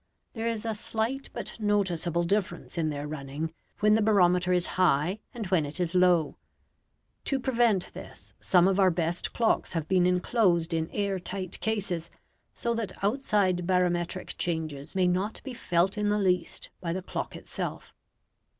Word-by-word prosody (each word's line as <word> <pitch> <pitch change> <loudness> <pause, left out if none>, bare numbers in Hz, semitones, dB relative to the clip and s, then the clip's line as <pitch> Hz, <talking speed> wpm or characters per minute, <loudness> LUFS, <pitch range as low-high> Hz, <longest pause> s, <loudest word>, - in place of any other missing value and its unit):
There 225 -1 -3
is 230 -1 -2
a 225 - 0
slight 225 +5 -2
but - - -6
noticeable 180 -5 +1
difference 200 +3 -1
in 165 -2 0
their 145 0 -4
running 150 +2 -5 0.3
when 210 0 +5
the 220 - +4
barometer 180 -4 +4
is 180 -1 +2 0.2
high 175 +3 +3
and 230 -3 -5
when 175 -5 +4
it 145 +3 -5
is 175 -1 0
low. 180 -4 +3 0.9
To 275 - 0
prevent 235 -7 +1
this, - - -11
some 180 -1 +4
of 195 0 +2
our 190 -1 +6
best 170 0 -1
clocks 230 -5 +1
have 165 -3 -2
been 180 -2 +3
enclosed 180 -2 +2
in 160 0 -1
air 200 -2 -1
tight 185 0 -5
cases, 185 -7 -2 0.5
so 235 - -1
that 230 -4 -5
outside 200 -6 +1
barometric 180 -1 0
changes 160 -2 -3
may 185 -1 +3
not 185 +4 0
be 265 - -6
felt 185 -1 +1
in 210 0 +1
the 210 - +2
least 180 -3 0
by 170 -2 -2
the 185 +1 -4
clock - - -4
itself. - - -6
185 Hz, 165 wpm, -28 LUFS, 170-210 Hz, 0.9 s, our